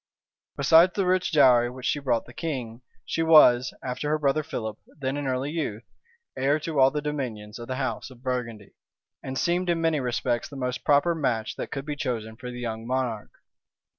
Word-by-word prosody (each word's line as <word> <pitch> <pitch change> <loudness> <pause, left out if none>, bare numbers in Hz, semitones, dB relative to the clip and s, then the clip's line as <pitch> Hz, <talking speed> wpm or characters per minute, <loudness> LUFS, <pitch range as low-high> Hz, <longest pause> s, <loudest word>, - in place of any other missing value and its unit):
Besides 165 +6 +6
the 195 - +1
rich 185 0 +1
dowry 125 -6 +5
which 125 0 -9
she 145 - +1
brought 125 -5 0
the 120 - -14
king, 125 -8 -5 0.2
she 165 - -2
was, 150 -6 +6
after 130 +3 -3
her 155 - +2
brother 150 0 +1
Philip, 110 -7 -5 0.2
then 135 -1 -2
in 145 -1 -3
early 130 +2 -1
youth, 130 -9 -3 0.5
heir 140 +3 +1
to 155 -2 -2
all 130 0 +7
the 150 +1 -4
dominions 120 -8 -4
of 120 - -8
the 130 - -3
house 130 0 -3
of 125 -1 -16
Burgundy; 115 -5 -4 0.5
and 130 0 -5
seemed 175 +3 0
in 170 -1 +1
many 165 -2 +1
respects 120 -1 -1
the 145 - -10
most 125 -2 -3
proper 145 +4 +3
match 125 -9 -1
that - - -5
could 135 0 -5
be 150 -1 -3
chosen 115 -7 -3
for 125 +2 -8
the 125 0 -7
young 115 -1 -5
monarch. 125 -4 -2
130 Hz, 195 wpm, -26 LUFS, 120-150 Hz, 0.5 s, all